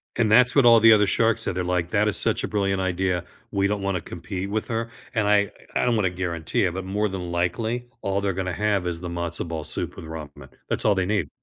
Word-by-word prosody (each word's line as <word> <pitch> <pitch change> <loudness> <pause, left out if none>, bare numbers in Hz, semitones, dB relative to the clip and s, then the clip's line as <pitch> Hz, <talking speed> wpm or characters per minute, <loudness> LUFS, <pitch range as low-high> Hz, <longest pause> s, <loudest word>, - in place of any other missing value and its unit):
And 110 -2 +2
that's 125 +4 +5
what 140 - +5
all 115 -1 +8
the 115 0 +8
other 105 -1 +5
sharks 115 +2 +2
said. 90 - -2
They're 90 - -1
like, 90 -1 -1
"That 105 0 +2
is 105 - 0
such - - 0
a - - -1
brilliant 95 -2 0
idea. 90 -1 0 0.3
We 100 -1 +1
don't 100 0 -2
wanna 95 -3 -1
compete 90 +4 -6
with 110 +1 -2
her." 115 0 -2 0.2
And 110 -3 +1
I 100 -1 +3 0.2
I - - +2
don't 120 -2 +2
wanna 100 -4 +2
guarantee 85 -3 -2
it, 90 - -1
but 95 0 -5
more 105 +3 0
than 90 -2 -5
likely, 110 +8 -1
all 100 0 -1
they're 100 -2 0
gonna 95 -1 -3
have 100 -1 0
is 85 -1 -3
the 90 - -5
matzo 85 0 -3
ball 80 -2 -4
soup - - -5
with 80 - -9
ramen. 75 -4 -9 0.2
That's - - 0
all 105 -2 +4
they 95 -1 +1
need. 100 -7 0
95 Hz, 250 wpm, -24 LUFS, 90-105 Hz, 0.3 s, all